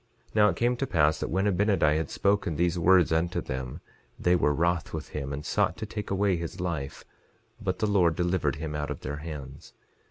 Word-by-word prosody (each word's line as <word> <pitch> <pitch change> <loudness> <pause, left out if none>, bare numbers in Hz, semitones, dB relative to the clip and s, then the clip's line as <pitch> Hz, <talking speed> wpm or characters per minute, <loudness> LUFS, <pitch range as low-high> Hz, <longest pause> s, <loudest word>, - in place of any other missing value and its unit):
11:26 - - -25
Now 105 -1 +6
it - - -1
came 120 +1 +1
to 135 - -2
pass 75 -5 +2
that - - -3
when 95 +4 0
Abinadi 100 -6 +3
had 80 -2 -2
spoken 100 -5 +1
these 85 +2 +1
words 90 0 +5
unto 85 +2 +1
them 65 -1 -5 0.4
they 90 0 +3
were 75 - +2
wroth 85 +3 0
with 80 -1 -5
him, 70 -2 -4
and 70 +1 -5
sought 80 - +1
to 110 - -4
take 105 0 -6
away 95 -1 +1
his 85 +1 -6
life; 80 -7 -4 0.6
but - - -1
the 110 - 0
Lord 90 -6 +3
delivered 90 +1 0
him 75 0 -5
out 75 0 -3
of 75 - -5
their 70 +2 -4
hands. 75 -4 -8
85 Hz, 215 wpm, -28 LUFS, 75-95 Hz, 0.6 s, Now